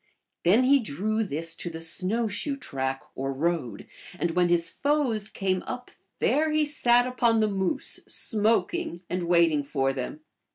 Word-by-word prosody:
Then 205 +9 +5
he 275 +2 +5
drew 215 - -1
this 165 -3 -2
to 175 - -6
tljie 165 0 -6
snow 195 +7 0
shoe 275 +7 -3
track 135 - -3
or 135 +1 -3
road, 135 -7 -2 0.3
and 170 -1 -1
when 175 +1 +2
his 170 -1 +3
foes 275 -8 0
came 185 -2 -1
u.b 250 - -6 0.2
there 310 +2 +2
he 305 0 +2
sat 245 -4 +4
upon 240 -3 +2
the 215 - +3
moose, 190 -3 0
smoking, 225 - 0
and 180 -1 -2
wait 170 -1 +4
img 145 -2 -1
for 135 -2 0
them. 135 - -5
190 Hz, 165 wpm, -26 LUFS, 165-240 Hz, 0.3 s, Then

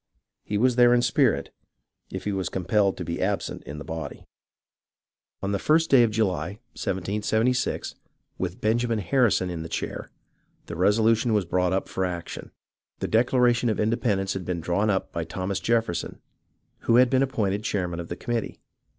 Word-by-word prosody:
He 105 - -2
was 125 +2 +2
there 120 0 +6
in 120 - +2
spirit, 115 - +2 0.6
if - - -6
he 105 - -1
was 95 -2 -2
compelled 95 +2 +1
to 90 - -5
be 85 +1 -3
absent 100 +2 -1
in 75 - -7
the 75 - -6
body. 80 -3 -6 1.2
On 100 - -1
the 100 - 0
first 160 +6 +2
day 135 -3 +8
of 120 - +4
July, 100 -4 -1 0.2
1776, 105 +6 -1 0.5
with 90 -1 -3
Benjamin 115 +1 +1
Harrison 105 -2 +2
in 85 -2 -4
the 80 - -7
chair, - - -4 0.6
the - - -7
resolution 110 +5 +3
was 100 -3 +1
brought 90 +1 +1
up 95 +1 0
for 95 - -2
action. 90 -2 -5 0.5
The - - -3
Declaration 120 +1 +3
of 110 - -1
Independence 105 -4 0
had 95 - -4
been 90 -1 -3
drawn 90 +6 0
up 95 -2 0
by 85 - -3
Thomas 95 +3 -3
Jefferson, 115 -7 -1 0.6
who 115 - +2
had 125 0 +5
been 130 0 +3
appointed 105 -6 0
chairman 90 -5 -2
of 85 - -5
the 85 - -5
committee. 120 +3 -3
100 Hz, 170 wpm, -25 LUFS, 90-115 Hz, 1.2 s, day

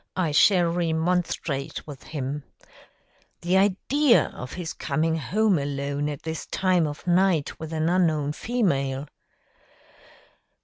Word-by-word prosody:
I 175 -4 0
shall 175 +3 +5
remonstrate 165 -4 -1
with 145 -3 -10
him. 145 -1 -4 1.0
The 175 +2 +1
idea 235 +8 +3
of 125 - -8
his 175 -3 -5
coming 160 +3 -1
home 195 +4 +1
alone 140 +1 -2
at 145 -2 -6
this 160 0 -5
time 185 -4 +1
of 145 0 -7
night 175 -3 +2
with 160 0 -7
an 160 0 0
unknown 160 -5 +2
female!" 140 - -1
160 Hz, 120 wpm, -25 LUFS, 145-185 Hz, 1.0 s, shall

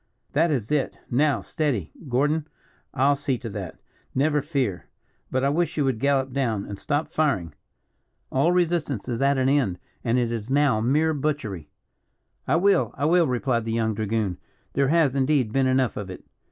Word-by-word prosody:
That 165 +4 +3
is 125 -7 -1
it. 150 -3 0
Now 145 +4 +2
steady. 135 - -2 0.2
Gordon, 150 +5 +1 0.4
I'll 140 +3 +3
see 140 -2 -1
to 115 -2 -7
that 95 -4 -6 0.4
never 150 +2 +2
fear. 135 - -2 0.4
But 130 0 0
I 140 - +3
wish 165 +4 0
you 145 - +2
would 130 -4 0
gallop 135 -1 +1
down, 115 -7 -1
and 100 -1 -7
stop 145 +1 -1
firing. 100 - 0 0.8
All 140 +6 +3
resistance 170 - 0
is 120 -1 -2
at 140 0 +3
an 130 0 +2
end, 135 -10 +2 0.3
and 120 +1 +1
it 120 -2 +1
is 115 0 -4
now 140 -5 +3
mere 150 +7 +2
butchery." 135 - -3 0.8
"I - - +3
will, 195 +2 +3
I 145 - 0
will," 170 +1 +4
replied 125 -2 0
the 115 0 -3
young 110 -1 +1
dragoon; 105 -3 -1 0.3
"there 140 -1 +2
has, 150 -3 +3
indeed, 135 -4 +2
been 135 -1 +3
enough 130 -1 +2
of 100 -2 -5
it." 90 - -9
135 Hz, 180 wpm, -25 LUFS, 115-150 Hz, 0.8 s, will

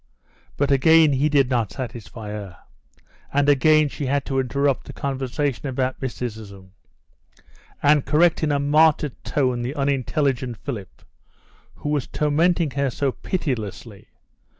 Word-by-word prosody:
But 140 0 +1
again 155 +2 +5
he 140 +3 +2
did 140 -3 +2
not 120 -4 0
satisfy 115 -4 -7
her, 100 -4 -7 0.7
and 145 0 +2
again 155 +2 +4
she 140 0 -5
had 140 +1 0
to 135 -1 -1
interrupt 140 +1 0
the - - -8
conversation 135 0 -3
about 130 0 -2
mysticism, 110 -7 -6 1.1
and 145 -1 +4
correct 165 +2 +3
in 155 -2 +1
a 145 - +2
martyred 150 0 +2
tone 125 -4 0
the 125 +4 -4
unintelligent 135 -3 -1
Philip, 105 -6 -8 0.7
who 145 - -5
was 145 -4 -1
tormenting 160 +1 +1
her 140 0 0
so 135 +2 -1
pitilessly. 115 - -5
140 Hz, 130 wpm, -22 LUFS, 125-145 Hz, 1.1 s, again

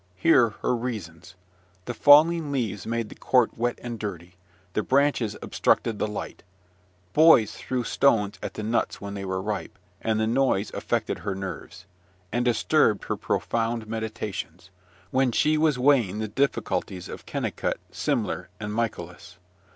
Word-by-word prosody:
Hear 125 - +4
her - - +2
reasons. 100 -9 -6 0.5
The 120 - -3
falling 150 +4 +6
leaves 120 -7 -2
made 115 -1 -2
the - - -9
court 125 -3 +2
wet 120 +1 -1
and 120 -2 -5
dirty; 90 -4 -6 0.4
the - - +1
branches 130 -5 +1
obstructed 110 -3 +1
the - - 0
light; 105 - -6 0.7
boys 150 -10 +6
threw 125 -1 -3
stones 110 -5 +2
at - - -6
the 105 - -5
nuts 115 +2 -1
when 100 0 -6
they 100 -1 -5
were 95 0 -2
ripe, 105 -2 -4 0.2
and 110 -1 0
the 110 - +2
noise 115 -3 +1
affected - - -2
her 100 - -3
nerves; 95 0 -7 0.5
and 120 - 0
disturbed 120 -1 +2
her - - -2
profound 115 0 -1
meditations, 105 -5 -5 0.4
when 130 -1 +2
she 155 +6 +2
was 155 -3 +2
weighing 125 -7 +3
the 110 0 -2
difficulties 105 -6 -1
of - - -9
Kennicot, - - -2
Semler, - - -2
and 105 0 -4
Michaelis. 90 -6 -4
115 Hz, 150 wpm, -26 LUFS, 100-125 Hz, 0.7 s, falling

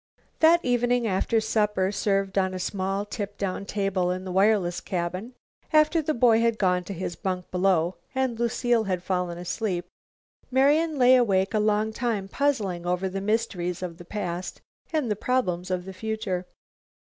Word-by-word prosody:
That 335 +2 +5
evening, 245 -1 +2
after 205 +2 +1
a - - +3
supper 210 -3 +1
served 195 -1 0
on 190 -1 +1
a - - -4
small 195 +2 -2
tip 205 -1 -5
down 200 0 -3
table 195 -3 0
in 185 +1 -3
the 185 - -5
wireless 190 -2 +2
cabin, 185 +7 -4 0.4
after 310 +1 +4
the 310 0 -1
boy 230 -2 +5
had 230 -1 +2
gone 180 -3 +2
to 200 - -5
his 175 0 -4
bunk 185 0 -4
below, 180 -2 +1 0.2
and 260 -3 0
Lucile 235 -1 +1
had 185 -2 -2
fallen 180 -2 -1
asleep, 180 0 -2 0.6
Marian 290 +4 +3
lay 255 0 +6
awake 195 -6 +2
a 215 - +2
long 215 +1 +1
time 220 -5 -2
puzzling 200 -10 -1
over 180 +2 0
the 195 +1 -4
mysteries 195 -5 -1
of 175 -1 -6
the - - -9
past 180 -2 -4 0.3
and 300 -8 0
the - - +1
problems 190 -7 -1
of 180 -1 -2
the 190 - -7
future. 195 -3 -3
200 Hz, 175 wpm, -26 LUFS, 185-230 Hz, 0.6 s, lay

